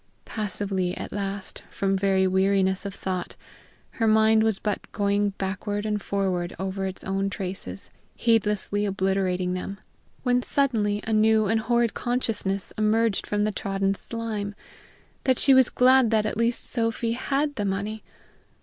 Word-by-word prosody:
Passively 195 -3 -2
at - - -6
last, 200 -1 -5
from 195 0 0
very 190 -1 +2
weariness 190 +1 +2
of 195 - -7
thought, 185 -2 -4 0.6
her 225 - 0
mind 220 0 +5
was 220 -2 +2
but 210 0 -3
going 205 0 +1
backward 205 +2 -3
and 210 -1 -1
forward 185 -3 -1
over 190 0 -3
its 190 - -7
own 195 +1 -1
traces, 180 - -6 0.2
heedlessly 210 -3 +1
obliterating 190 -2 0
them, 195 +2 -5 0.4
when 250 -1 +2
suddenly 220 -7 0
a 225 - -1
new 215 0 +4
and 220 +2 +2
horrid 235 0 +1
consciousness 215 -6 -2
emerged 215 0 +2
from 205 0 0
the 215 - +1
trodden 195 -1 -1
slime 210 -1 -5 0.7
that 260 -2 +3
she 275 - +4
was 260 -1 +6
glad 255 -1 +5
that 215 -1 +2
at 215 - -2
least 230 +2 0
Sophy 230 -1 0
had 280 +4 0
the 210 - -3
money! 200 +2 -2
205 Hz, 150 wpm, -25 LUFS, 195-225 Hz, 0.7 s, was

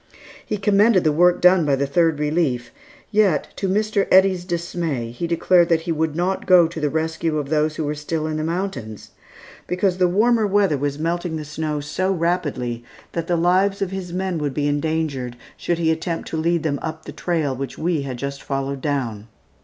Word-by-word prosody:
He 210 - -3
commended 200 0 +4
the 155 - +3
work 175 +3 +3
done 180 -1 +6
by 145 -2 +2
the 140 +1 0
Third 160 +2 +2
Relief; 150 -5 -1 0.4
yet, 205 -7 +2
to 195 - -1
Mr. 210 0 +1
Eddy's 190 -1 +4
dismay, 170 -8 -3
he 170 +8 -4
declared 170 +1 +3
that 165 -1 +3
he 165 - -3
would 160 -1 -1
not 180 +3 -1
go 180 -2 +7
to 165 0 -7
the 150 -1 0
rescue 160 +1 -1
of 145 -2 -3
those 155 0 +1
who 160 - -2
were 150 0 -1
still 155 +1 -3
in 155 0 -2
the 155 - -2
mountains, 160 - -4 0.6
because 180 +1 0
the 180 - +4
warmer 220 +4 +3
weather 200 -5 +2
was 145 0 -2
melting 170 +1 -2
the 155 -1 -5
snow 150 0 -3
so 185 +6 -1
rapidly 160 -9 -1 0.3
that 170 -1 -3
the 175 - +1
lives 185 +4 +2
of 195 -2 -2
his 190 -2 -5
men 185 -1 -2
would 145 -3 -3
be 145 -1 0
endangered 145 -4 -1 0.2
should 175 - -2
he 165 -1 +2
attempt 165 +1 -3
to - - -4
lead 170 +1 +1
them 140 -3 -1
up 160 0 -6
the - - -7
trail 160 -6 -1
which 135 +1 -6
we 165 -2 0
had 135 -3 -5
just 140 +2 -5
followed 135 0 -3
down. 120 -8 -2
160 Hz, 200 wpm, -21 LUFS, 145-180 Hz, 0.6 s, go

